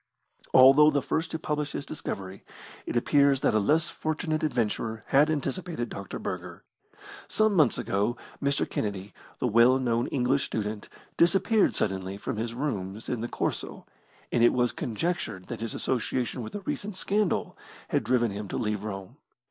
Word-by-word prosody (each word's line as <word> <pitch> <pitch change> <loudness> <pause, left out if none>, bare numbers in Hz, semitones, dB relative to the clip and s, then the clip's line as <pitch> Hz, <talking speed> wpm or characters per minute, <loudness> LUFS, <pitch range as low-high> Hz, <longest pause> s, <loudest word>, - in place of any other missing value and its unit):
Although 135 +4 +8
the 140 -3 0
first 160 0 -1
to - - -3
publish 150 -2 -2
his 140 - -4
discovery, 95 -10 -6 0.4
it - - -1
appears 140 +2 +3
that - - +2
a 110 - +4
less 155 +10 +3
fortunate 155 0 -2
adventurer 115 -5 -1
had 145 +3 +5
anticipated 155 -2 -2
Dr. 100 -1 -6
Burger. - - -6 0.6
Some 215 -1 +2
months 155 -10 +4
ago 105 +5 0 0.2
Mr. 140 0 +1
Kennedy, 100 -1 -4 0.2
the - - -2
well 120 +3 +5
known 120 -2 0
English 135 +1 +1
student, 105 -1 -4 0.3
disappeared 195 +5 +3
suddenly 95 -1 -2
from 105 - -4
his 115 +1 -3
rooms 110 -7 -4
in 120 -3 -2
the 120 - -2
"Corso", - - -3 0.5
and 120 - +2
it 120 - +6
was 125 -2 +2
conjectured 125 - -3
that 115 -2 -5
his 115 -1 -3
association 125 0 -1
with 110 - -7
a 205 - -4
recent 200 0 -4
scandal 200 0 0 0.3
had - - +1
driven 120 -3 +2
him 100 +1 -5
to - - -4
leave 105 -2 -2
Rome. 95 -3 -6
125 Hz, 165 wpm, -27 LUFS, 110-150 Hz, 0.6 s, Although